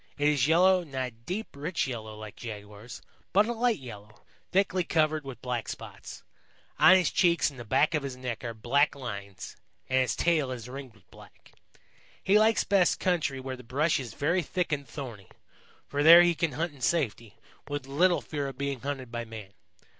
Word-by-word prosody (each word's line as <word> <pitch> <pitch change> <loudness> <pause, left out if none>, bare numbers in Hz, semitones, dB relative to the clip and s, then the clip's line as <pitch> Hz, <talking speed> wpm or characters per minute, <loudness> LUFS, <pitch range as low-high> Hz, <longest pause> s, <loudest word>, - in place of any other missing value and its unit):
It 145 0 +3
is 145 -3 +2
yellow, 180 +3 +4
not 135 -5 -3
a - - -19
deep, 175 - -6
rich 160 +5 -2
yellow 110 -4 -6
like 110 -1 -9
Jaguar's, 105 0 -9 0.3
but 205 +2 +5
a 240 - -2
light 240 0 +1
yellow, 105 -5 -12 0.3
thickly 185 -1 +2
covered 155 -2 +1
with 135 -4 -9
black 125 -2 -3
spots. - - -9 0.6
On 185 - +8
his 180 -4 +2
cheeks 170 -4 +3
and 135 - -13
the - - -6
back 135 +8 +2
of 155 - +1
his 135 -2 -6
neck 125 -2 -5
are 115 -1 -5
black 140 +8 +2
lines, 100 -7 -7 0.3
and 130 0 +2
his 130 - 0
tail 160 -6 +1
is 125 -2 -6
ringed 130 -2 -9
with 90 -4 -26
black. - - -17 0.7
He 205 +2 +5
likes 220 +1 +3
best 195 -3 +2
country 160 -7 0
where 130 0 -5
the 125 - -12
brush 140 +7 +1
is 125 -5 -7
very 170 +6 +1
thick 175 +2 -2
and 140 -2 -2
thorny, 115 - -8 0.6
for 145 - -2
there 170 +3 +9
he 175 0 +3
can 165 -3 -1
hunt 160 +3 -2
in 140 - -17
safety, 120 -9 -1 0.3
with 145 -2 -4
little 175 +6 +2
fear 145 -2 -4
of 135 -2 -8
being 140 -1 -3
hunted 130 -2 -5
by 120 0 -3
man. 110 -4 -10
140 Hz, 195 wpm, -28 LUFS, 120-170 Hz, 0.7 s, there